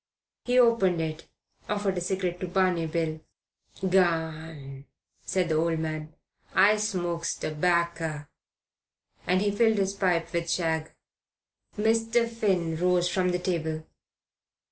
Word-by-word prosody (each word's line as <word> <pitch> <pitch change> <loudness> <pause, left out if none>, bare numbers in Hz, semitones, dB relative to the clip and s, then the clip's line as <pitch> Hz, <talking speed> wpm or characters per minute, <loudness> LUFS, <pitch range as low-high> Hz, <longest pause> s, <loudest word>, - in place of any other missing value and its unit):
He 250 0 +2
opened 230 -8 +4
it, 160 0 -4 0.4
offered 205 -2 0
a 180 - -2
cigarette 180 -1 -2
to 185 - -3
Barney 180 -2 +1
Bill. 160 -1 -2 0.7
"Garn!" 160 -6 -1 0.4
said 185 -3 0
the 160 - +1
old 165 +1 +1
man. 155 -1 -4 0.4
"I 210 +1 +6
smokes 175 -5 -1
terbakker," 165 -2 -1 1.0
and 185 +2 +2
he 205 - +1
filled 220 +1 +3
his 195 -1 +1
pipe 180 -4 0
with 170 0 -1
shag. 160 -3 0 0.9
Mr. 225 +2 +2
Finn 190 -8 0
rose 180 0 +2
from 180 0 +1
the 180 - +1
table. 160 -3 -2
175 Hz, 120 wpm, -27 LUFS, 160-195 Hz, 1.0 s, I